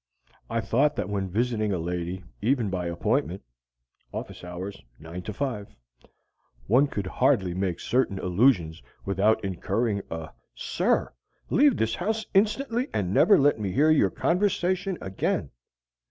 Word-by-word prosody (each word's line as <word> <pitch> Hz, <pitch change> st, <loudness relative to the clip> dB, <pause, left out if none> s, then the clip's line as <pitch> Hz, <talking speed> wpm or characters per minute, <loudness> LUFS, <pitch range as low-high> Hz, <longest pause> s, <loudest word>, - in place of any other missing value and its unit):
I 115 Hz, 0 st, 0 dB
thought 145 Hz, +7 st, +2 dB
that -, -, -3 dB
when 100 Hz, -2 st, -2 dB
visiting 110 Hz, +1 st, 0 dB
a 95 Hz, -, 0 dB
lady, 90 Hz, +2 st, -3 dB, 0.2 s
even 115 Hz, -2 st, +1 dB
by 90 Hz, -2 st, -2 dB
appointment 85 Hz, +1 st, -1 dB, 0.7 s
(office -, -, -7 dB
hours: 90 Hz, +3 st, -7 dB, 0.2 s
9 80 Hz, +3 st, -8 dB
5) 105 Hz, +1 st, -4 dB, 0.9 s
one 130 Hz, +7 st, +4 dB
could 100 Hz, -8 st, -4 dB
hardly 95 Hz, -1 st, +2 dB
make 95 Hz, -2 st, -2 dB
certain 120 Hz, -5 st, 0 dB
allusions 90 Hz, -, +2 dB, 0.2 s
without 100 Hz, +2 st, +2 dB
incurring 100 Hz, +3 st, -1 dB
a 80 Hz, -1 st, -6 dB, 0.2 s
"Sir! -, -, 0 dB, 0.4 s
Leave 285 Hz, -2 st, +5 dB
this 110 Hz, 0 st, 0 dB
house 220 Hz, -, -2 dB
instantly 230 Hz, +5 st, +1 dB
and 95 Hz, -2 st, -1 dB
never 205 Hz, -, +6 dB
let 140 Hz, -4 st, +3 dB
me 100 Hz, -3 st, -2 dB
hear 150 Hz, +4 st, +4 dB
your 155 Hz, -, +4 dB
conversation 185 Hz, 0 st, 0 dB
again!" 95 Hz, 0 st, -2 dB
105 Hz, 135 wpm, -26 LUFS, 95-140 Hz, 0.9 s, never